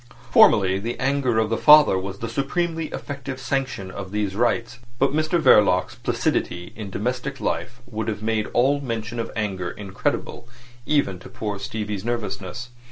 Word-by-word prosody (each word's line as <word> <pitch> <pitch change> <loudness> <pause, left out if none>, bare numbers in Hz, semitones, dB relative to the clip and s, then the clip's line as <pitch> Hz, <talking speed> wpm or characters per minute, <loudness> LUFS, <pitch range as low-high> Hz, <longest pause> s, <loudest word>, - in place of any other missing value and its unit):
Formerly 95 -1 +6
the 115 +4 -4
anger 135 -3 +1
of 110 0 +1
the 115 - 0
father 150 -7 +8
was 95 +1 -4
the 115 - -4
supremely 160 +6 -1
effective 140 -3 -6
sanction 130 -7 -2
of 95 0 -7
these 105 -2 -2
rites, 120 +1 0 0.2
but 135 +2 +2
Mr 155 +3 +1
Verloc's 90 - +4
placidity 90 0 -2
in 105 -2 -6
domestic 125 +7 -3
life 125 +1 -3
would 110 -2 -5
have 110 -1 -3
made 110 -1 0
all 140 +4 +2
mention 115 -2 -4
of 115 - -3
anger 95 -5 -2
incredible 100 +4 -4 0.4
even 120 -12 +1
to - - -12
poor 105 -2 -4
Stevie's 105 -1 -4
nervousness. 120 -1 -4
115 Hz, 160 wpm, -23 LUFS, 100-135 Hz, 0.4 s, father